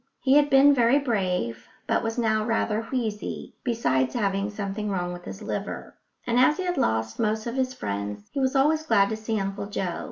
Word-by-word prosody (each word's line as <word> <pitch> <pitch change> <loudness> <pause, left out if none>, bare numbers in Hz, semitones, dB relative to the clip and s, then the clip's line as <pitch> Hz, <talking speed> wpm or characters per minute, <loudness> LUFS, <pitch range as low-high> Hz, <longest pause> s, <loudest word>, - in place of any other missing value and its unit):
He 265 - +2
had 290 0 +5
been 275 +1 +7
very 245 +1 +4
brave, 180 - -1 0.2
but - - +1
was 225 0 -3
now 220 -2 +1
rather 220 -1 0
wheezy, 225 -5 -3
besides 130 - 0
having 200 -3 0
something 210 0 -4
wrong 180 -2 -2
with 175 0 -10
his 205 - -8
liver; 200 -1 -5 0.3
and 240 0 +2
as 280 +5 +5
he 375 - -2
had 355 -1 -1
lost 110 - 0
most 220 0 0
of 235 - -3
his 260 0 -1
friends 100 - -4
he - - -2
was 265 +1 +1
always 300 +4 +3
glad 205 -9 +3
to 220 - -2
see 220 0 -2
Uncle 195 +1 -3
Joe. 185 -4 -3
220 Hz, 200 wpm, -26 LUFS, 195-255 Hz, 0.3 s, been